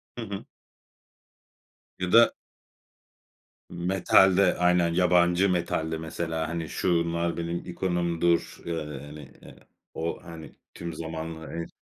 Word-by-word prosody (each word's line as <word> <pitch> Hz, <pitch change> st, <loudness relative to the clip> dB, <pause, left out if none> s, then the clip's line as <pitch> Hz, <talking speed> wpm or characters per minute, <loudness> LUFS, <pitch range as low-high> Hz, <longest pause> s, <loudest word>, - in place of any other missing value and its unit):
Hı 120 Hz, -, -5 dB
hı. 100 Hz, -3 st, -6 dB, 1.5 s
Ya 90 Hz, -1 st, -2 dB
da 115 Hz, +1 st, +8 dB, 1.4 s
Metalde. 95 Hz, +1 st, +4 dB
Aynen, 90 Hz, -1 st, +3 dB
yabancı 90 Hz, +1 st, +3 dB
metalde 85 Hz, -2 st, -1 dB
mesela, 80 Hz, 0 st, -3 dB
hani 85 Hz, -1 st, -4 dB
"Şunlar 85 Hz, -1 st, 0 dB
benim 85 Hz, 0 st, -2 dB
ikonumdur." 85 Hz, -1 st, 0 dB
ııı, 75 Hz, -4 st, -4 dB
yani 75 Hz, -1 st, -11 dB, 0.6 s
o 80 Hz, +1 st, -4 dB
hani, 85 Hz, -2 st, -10 dB, 0.2 s
tüm 85 Hz, -1 st, -6 dB
zamanlar 80 Hz, 0 st, -6 dB
hani 85 Hz, 0 st, -5 dB
85 Hz, 100 wpm, -27 LUFS, 80-90 Hz, 1.5 s, da